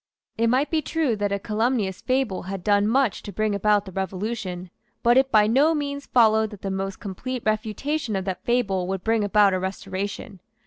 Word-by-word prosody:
It 230 +1 +1
might 260 +5 +1
be 320 -1 +2
true 300 -5 0
that 205 -1 -1
a 200 - +1
calumnious 215 -1 -1
fable 255 -7 0
had 190 0 -6
done 205 0 +3
much 255 -1 +1
to 205 - -8
bring 215 +2 -1
about 205 0 +2
the 190 - -9
Revolution. 190 -1 -4 0.3
But 240 +1 +5
it 265 +1 +3
by 210 -1 +5
no 280 +9 +3
means 280 -1 -4
followed 220 -2 +4
that 210 -3 -12
the 195 - -2
most 195 0 -3
complete 235 +5 -5
refutation 220 +4 -1
of 190 -1 -2
that 190 -2 -4
fable 200 -7 0
would 190 -1 -3
bring 225 -1 +1
about 205 -1 +4
a 185 - 0
Restoration. 190 0 -5
210 Hz, 195 wpm, -24 LUFS, 195-240 Hz, 0.3 s, But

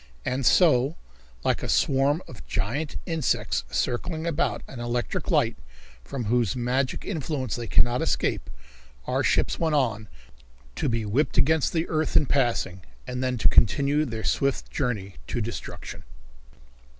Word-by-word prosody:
And 125 -1 0
so, 150 -4 +4 0.5
like - - +1
a - - -4
swarm 140 +5 +2
of 115 - -11
giant 140 +10 -2
insects 160 -6 0
circling 160 +6 -1
about 170 -1 0
an 130 - -9
electric 120 +7 -2
light 145 -10 +2 0.5
from 125 - -5
whose 120 -1 +1
magic 130 +2 -1
influence 145 - -2
they 120 -1 -5
cannot 120 +1 +3
escape, - - 0 0.6
our - - 0
ships - - +1
went 160 -2 +1
on, 110 -6 0 0.7
to 145 - 0
be 115 -2 -1
whipped 125 +9 0
against 160 0 +3
the 165 -1 0
earth 155 -1 +1
in 150 - +4
passing 120 -9 0 0.2
and 125 +1 -3
then 130 -1 0
to - - +4
continue 140 +6 +4
their 115 -6 -4
swift 140 -1 0
journey 105 - -2
to - - -2
destruction. 115 +1 -6
130 Hz, 145 wpm, -26 LUFS, 120-150 Hz, 0.7 s, so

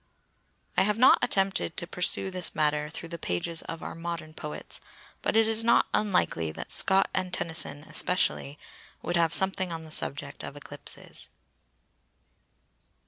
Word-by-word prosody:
I - - +6
have 210 +2 +2
not 255 - +7
attempted 195 -7 0
to - - -2
pursue 180 +2 +3
this 185 -2 +1
matter 150 0 +1
through 165 +2 -8
the 170 0 -6
pages 160 - -3
of 165 - -8
our - - -5
modern 165 -2 -6
poets, 150 -1 -7 0.4
but - - +1
it 225 -1 +5
is 225 0 0
not 235 - +4
unlikely 180 - +1
that - - -7
Scott 195 0 +4
and 185 -1 -2
Tennyson 160 -4 -2
(especially) 155 -4 0 0.5
would 175 +2 -1
have 165 -2 +3
something 190 0 +2
on 165 -1 -5
the 160 - -11
subject 145 -2 -3
of - - -7
eclipses. - - -4
170 Hz, 150 wpm, -28 LUFS, 155-190 Hz, 0.5 s, not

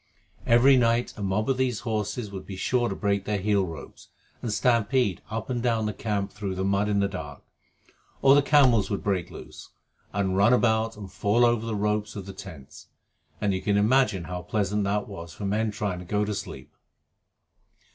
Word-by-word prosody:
Every 130 +3 +6
night 120 0 +2
a - - -9
mob 100 +2 0
of 135 -1 +1
these 130 -4 0
horses 110 -1 -3
would 95 -1 -8
be 95 - -6
sure 120 +5 0
to - - -3
break 100 -2 -1
their 105 -1 -1
heel 100 -1 +1
ropes 80 -4 -10 0.3
and 115 - -3
stampede 115 -3 +1
up 110 0 -4
and 125 -2 -2
down 115 -3 +1
the 105 - -2
camp 100 -1 -2
through 100 -2 -5
the 95 - -2
mud 100 +1 +1
in 100 -1 +2
the 100 - +2
dark, 75 -7 -8 0.8
or 135 0 +7
the 145 - +6
camels 130 -8 +4
would 100 - -3
break 95 -4 -1
loose - - -11 0.4
and 95 -2 -1
run 100 +5 +5
about 110 -2 +2
and 100 -3 -9
fall 110 +4 +2
over 120 -1 +1
the 110 - -2
ropes 105 +1 -1
of 100 -2 -6
the 100 - -8
tents, 80 -8 -11 0.5
and 100 -2 0
you 95 - -2
can 100 -1 +1
imagine 110 -3 +3
how 90 +2 -5
pleasant 100 +3 -1
that 100 +1 -1
was 85 -5 -9
for 105 - -6
men 110 +3 0
trying 105 -3 -3
to 90 - -9
go 105 +3 0
to 105 - -2
sleep. 100 - -7
105 Hz, 200 wpm, -26 LUFS, 100-115 Hz, 0.8 s, or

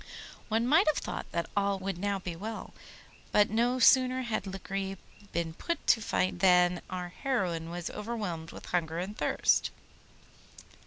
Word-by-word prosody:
One 225 +1 +2
might 310 +9 +5
have 305 - +3
thought - - -5
that 170 -1 -1
all 200 -1 +2
would 190 -2 -4
now 200 +1 0
be 180 -3 -5
well, 215 +5 -6 0.6
but 210 0 +4
no 240 +3 +2
sooner 255 0 +5
had 215 -4 -2
Lagree 195 0 -4 0.3
been 165 -1 -2
put 340 - -3
to 225 - +4
fight 185 -2 0
than 180 -1 +5
our 180 -1 -4
heroine 180 - -2
was 175 0 -4
overwhelmed 205 -7 -4
with - - -10
hunger 165 -2 -1
and 190 +4 -4
thirst. - - +2
195 Hz, 155 wpm, -30 LUFS, 175-225 Hz, 0.6 s, might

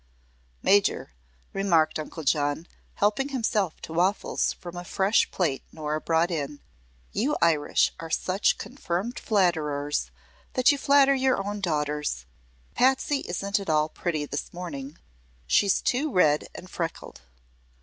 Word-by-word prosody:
"Major," 200 0 +3 0.4
remarked 170 -6 +2
Uncle 155 +1 -6
John, 145 +3 0 0.3
helping 210 +7 +1
himself 220 - -1
to 160 - -8
waffles 185 +5 +1
from 175 0 -10
a 175 - -5
fresh 195 +4 +2
plate 155 -8 -1
Nora 155 -1 -3
brought 165 +2 +1
in, 145 -3 -3 0.5
"you 270 +8 0
Irish 160 -3 +3
are 165 - -7
such 185 +4 +1
confirmed 230 -3 -4
flatterers 150 - 0 0.4
that 255 +2 +5
you 285 - -1
flatter 275 0 +5
your 265 -1 +2
own 205 0 -3
daughters. 150 - -1 0.5
Patsy 265 +2 +2
isn't 200 +4 -1
at 195 - -6
all 155 0 +2
pretty 155 -3 -2
this 145 0 -5
morning. 155 -4 -7 0.5
She's 200 - +3
too 280 +4 0
red 155 -7 +3
and 185 - -9
freckled." 165 - -5
175 Hz, 130 wpm, -26 LUFS, 155-205 Hz, 0.5 s, that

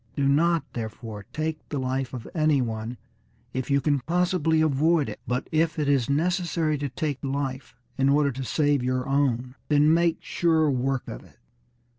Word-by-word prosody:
Do 140 -2 +1
not, 165 +4 +3
therefore, 110 -2 -6
take 155 0 -2
the 145 - -3
life 130 -1 -2
of 125 -3 -7
any 155 -3 +3
one, 115 0 -3 0.6
if 130 -1 -3
you 140 0 +3
can 145 +1 +1
possibly 170 +1 +1
avoid 155 +1 +2
it; - - -7
but 125 +1 -1
if 160 0 +1
it 150 -2 0
is 140 -4 +2
necessary 165 0 +1
to 145 0 -2
take 145 +1 -3
life 135 -1 -3 0.2
in 135 0 +4
order 145 0 +3
to 135 +1 -5
save 145 +1 +1
your 130 +1 -1
own, 130 -3 0
then 150 +1 +4
make 170 0 +2
sure 160 -3 +2
work 130 0 -1
of - - -7
it." - - -20
140 Hz, 175 wpm, -26 LUFS, 130-155 Hz, 0.6 s, in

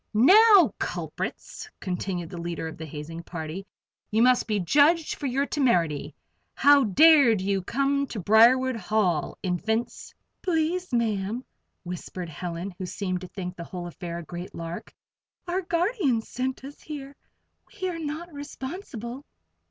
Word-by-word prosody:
"Now, 400 - +7
culprits!" 435 - -5
continued 180 -2 -3
the 175 - -6
leader 170 -1 -4
of 160 - -7
the 160 - -6
hazing 155 +3 -7
party, 170 +3 -6 0.4
"you 220 +2 +3
must 250 0 +4
be 210 -2 0
judged 295 - +3
for 285 - -4
your 270 +2 +1
temerity. 175 - +1 0.4
How 285 -2 +6
dared 275 - +6
you 195 0 0
come 275 +7 0
to 225 - -5
Briarwood 235 +6 +5
Hall, 205 -8 0
Infants?" 220 +6 -2 0.3
"Please, 350 +1 0
Ma'am," 225 0 -1 0.4
whispered 180 0 -6
Helen, 175 +3 -5
who 185 - -4
seemed 185 -1 -3
to 185 - -7
think 180 0 -6
the 170 - -7
whole 175 +1 -7
affair 170 0 -6
a 170 - -6
great 175 +3 -8
lark, 165 0 -6 0.6
"our 360 +2 0
guardians 340 - 0
sent 260 +1 -3
us 280 +2 -10
here. 280 -2 -8 0.6
We 375 - -1
are 345 -2 -4
not 320 +2 -5
responsible." 275 - -7
225 Hz, 145 wpm, -26 LUFS, 180-285 Hz, 0.6 s, Now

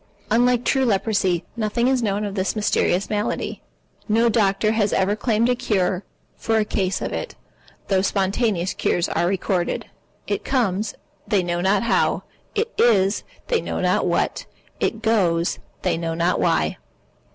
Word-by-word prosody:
Unlike 245 +2 +3
True 270 -1 +2
Leprosy, 195 -5 +1
nothing 235 +2 0
is 260 -1 +2
known 205 -2 0
of 200 - -4
this 190 +1 -1
mysterious 205 -3 +1
malady. 210 -1 -2 0.5
No 230 +2 +4
doctor 215 -1 +2
has 215 -2 +1
ever 195 +2 +2
claimed 220 +1 +1
a 250 - +3
cure 200 -6 0 0.3
for 225 0 0
a 215 - +2
case 190 -2 -1
of - - -3
it, - - -4 0.5
though 190 -2 +2
spontaneous 195 -1 0
cures 175 - 0
are 175 - +1
recorded. 185 -1 -1 0.4
It - - -2
comes, 215 -5 0 0.3
they 200 -3 +2
know 175 0 -1
not 195 +3 +2
how. 230 - +1 0.3
It 450 +2 -1
is, 200 -4 +3 0.2
they 470 -2 +1
know - - -3
not - - +1
what. - - -1 0.3
It - - -1
goes, 180 -7 +2 0.2
they 175 -3 +1
know 165 -1 -2
not 170 +2 +1
why. 80 -1 +1
205 Hz, 155 wpm, -22 LUFS, 185-230 Hz, 0.5 s, No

